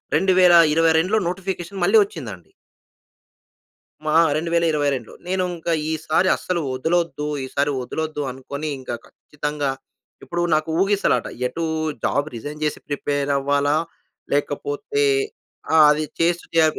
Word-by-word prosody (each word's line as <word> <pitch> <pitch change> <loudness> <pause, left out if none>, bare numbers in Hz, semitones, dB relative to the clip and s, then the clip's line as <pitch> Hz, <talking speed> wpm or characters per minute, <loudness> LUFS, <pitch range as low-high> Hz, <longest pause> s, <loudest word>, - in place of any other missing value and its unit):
2022లో 170 0 +5
notification 185 0 -4
మళ్ళీ 195 +5 +5
వచ్చిందండి. 105 - -9 1.6
మా 155 - +1 0.2
2022 155 -6 0
నేను 185 0 0
ఇంకా 170 +1 -2 0.2
ఈసారి 160 +3 +1
అస్సలు 180 -2 -2
వదలొద్దు. 160 +1 -1 0.2
ఈసారి 140 +2 0
వదలొద్దు 155 +3 -3
అనుకోని, 140 +4 -6
ఇంక 130 - -9 0.2
ఖచ్చితంగా 150 -1 -4 0.5
ఇప్పుడు 175 0 -2
నాకు 155 +1 0
ఊగిసలాట. 200 +1 +2 0.2
ఎటు 165 +6 -4 0.4
జాబ్ 145 +1 +1
రిజైన్ 145 +6 -7
జేసి 150 - -1
ప్రిపేర్ 145 0 -1
అవ్వాలా, 145 +1 +1 0.6
లేకపోతే 145 - -1 0.7
ఆ! - - +6
అది 150 +1 +1 0.2
చేస్తూ 170 +1 +1
జా 160 - +6
155 Hz, 105 wpm, -22 LUFS, 145-175 Hz, 1.6 s, ఆ